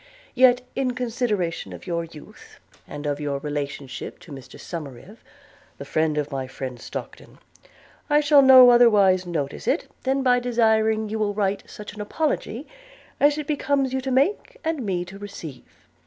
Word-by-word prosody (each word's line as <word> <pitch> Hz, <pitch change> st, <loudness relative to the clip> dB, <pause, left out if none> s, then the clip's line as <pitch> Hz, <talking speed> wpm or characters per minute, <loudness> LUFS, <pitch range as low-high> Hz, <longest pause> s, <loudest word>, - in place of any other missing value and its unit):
Yet, 250 Hz, -1 st, +5 dB
in 255 Hz, -2 st, -1 dB
consideration 225 Hz, -8 st, -2 dB
of -, -, -11 dB
your 170 Hz, -2 st, -2 dB
youth, 160 Hz, -2 st, -15 dB, 0.3 s
and 145 Hz, 0 st, -8 dB
of 145 Hz, 0 st, -2 dB
your 145 Hz, -2 st, -2 dB
relationship 140 Hz, -2 st, -5 dB
to 170 Hz, -, -14 dB
Mr 135 Hz, -2 st, -11 dB
Somerive, 165 Hz, -, -8 dB, 0.6 s
the -, -, -8 dB
friend 155 Hz, -1 st, 0 dB
of 150 Hz, 0 st, -2 dB
my 135 Hz, -1 st, -3 dB
friend 130 Hz, -1 st, -7 dB
Stockton, -, -, -8 dB, 0.7 s
I 295 Hz, 0 st, +5 dB
shall 295 Hz, -1 st, +6 dB
no 260 Hz, -2 st, +9 dB
otherwise 200 Hz, -6 st, +5 dB
notice 150 Hz, -5 st, -4 dB
it 300 Hz, -, 0 dB
than 270 Hz, +1 st, 0 dB
by 250 Hz, -1 st, +4 dB
desiring 220 Hz, -3 st, +1 dB
you 220 Hz, +1 st, -3 dB
will 205 Hz, -1 st, -1 dB
write 200 Hz, -1 st, -1 dB
such 210 Hz, -, -9 dB
an 210 Hz, -, -7 dB
apology 280 Hz, +2 st, -2 dB, 0.5 s
as 290 Hz, +1 st, +4 dB
it 300 Hz, -, -4 dB
becomes 275 Hz, -2 st, 0 dB
you 265 Hz, -, -1 dB
to 265 Hz, -, -4 dB
make, 365 Hz, -, 0 dB
and 320 Hz, -5 st, -2 dB
me 180 Hz, -4 st, -2 dB
to 190 Hz, +2 st, -11 dB
receive. 185 Hz, -9 st, -10 dB
210 Hz, 165 wpm, -23 LUFS, 160-260 Hz, 0.7 s, no